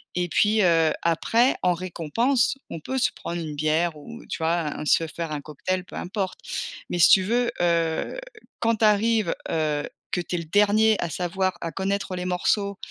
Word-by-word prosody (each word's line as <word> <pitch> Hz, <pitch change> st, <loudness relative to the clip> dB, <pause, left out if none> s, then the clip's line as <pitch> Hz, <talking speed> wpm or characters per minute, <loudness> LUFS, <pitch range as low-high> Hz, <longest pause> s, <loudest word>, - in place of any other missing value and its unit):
et 180 Hz, 0 st, -1 dB
puis, 215 Hz, +4 st, +3 dB
heu, 165 Hz, -3 st, +4 dB
après 225 Hz, +9 st, +2 dB
en 180 Hz, -, +4 dB
récompense, 185 Hz, -, 0 dB
on 165 Hz, -, -6 dB
peut 265 Hz, +11 st, -3 dB
se -, -, +3 dB
prendre 170 Hz, 0 st, -5 dB
une 155 Hz, -2 st, -5 dB
bière 155 Hz, +2 st, 0 dB
ou 230 Hz, +11 st, -10 dB
tu -, -, -4 dB
vois? 165 Hz, +1 st, +1 dB, 0.2 s
Un -, -, -5 dB
se 165 Hz, +2 st, +3 dB
faire 165 Hz, 0 st, -5 dB
un 150 Hz, -, -3 dB
cocktail 165 Hz, +6 st, -3 dB
peu -, -, -12 dB
importe 190 Hz, 0 st, -4 dB, 0.5 s
mais 175 Hz, -, -1 dB
si 160 Hz, -, +7 dB
tu 190 Hz, -, +6 dB
veux, 240 Hz, +4 st, +1 dB
heu, 170 Hz, -, 0 dB, 0.4 s
quand 230 Hz, 0 st, +2 dB
tu 220 Hz, -, +3 dB
arrives, 215 Hz, -2 st, +2 dB, 0.2 s
heu, 150 Hz, -2 st, -1 dB, 0.2 s
que 180 Hz, -, 0 dB
tu 175 Hz, -, -4 dB
es -, -, -1 dB
le 170 Hz, -, -5 dB
dernier 210 Hz, +5 st, +4 dB
à 170 Hz, -, -2 dB
savoir, 185 Hz, +3 st, -1 dB
à 165 Hz, -, -3 dB
connaître, 195 Hz, +1 st, -2 dB
heu, -, -, -2 dB
les 180 Hz, -, -4 dB
morceaux 200 Hz, +2 st, 0 dB
180 Hz, 200 wpm, -24 LUFS, 165-210 Hz, 0.5 s, si